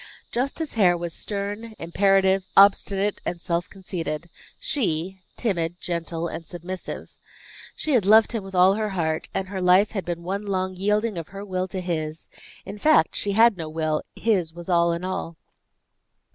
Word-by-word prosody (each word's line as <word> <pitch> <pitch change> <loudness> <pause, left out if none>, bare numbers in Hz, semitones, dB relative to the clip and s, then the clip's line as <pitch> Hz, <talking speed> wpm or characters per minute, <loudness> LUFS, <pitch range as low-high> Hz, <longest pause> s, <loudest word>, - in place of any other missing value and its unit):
Justice 275 +5 -1
Hare 180 -6 +4
was 170 -1 -4
stern, 205 +2 -5
imperative, 190 +2 +2
obstinate, 200 0 +4
and 175 - -3
self 170 +2 -2
conceited; 170 -4 -5 0.3
she, 190 - -1 0.2
timid, 175 -6 -1
gentle 170 -1 -3
and 165 0 -7
submissive. 180 +1 -7 0.6
She 310 - -1
had 220 -7 +3
loved 220 +1 +6
him 225 -4 -3
with 195 0 -9
all 185 +2 +6
her 215 +1 -1
heart, 160 -2 -1
and 190 -1 -3
her 195 -2 -4
life 185 +3 +5
had 195 -4 -3
been 170 -1 -4
one 195 +4 -3
long 185 -1 -1
yielding 210 +1 0
of 165 - -7
her 195 +1 -8
will 185 -1 -2
to 190 0 -4
his; 160 -3 -3 0.4
in 200 +2 -8
fact, 300 - +4
she 200 - -1
had 225 -1 +5
no 160 -3 -5
will; 155 -1 -1
his 185 -8 0
was 175 +1 -9
all 170 -1 +4
in 170 +1 -3
all. 185 -3 -4
185 Hz, 170 wpm, -24 LUFS, 170-205 Hz, 0.6 s, loved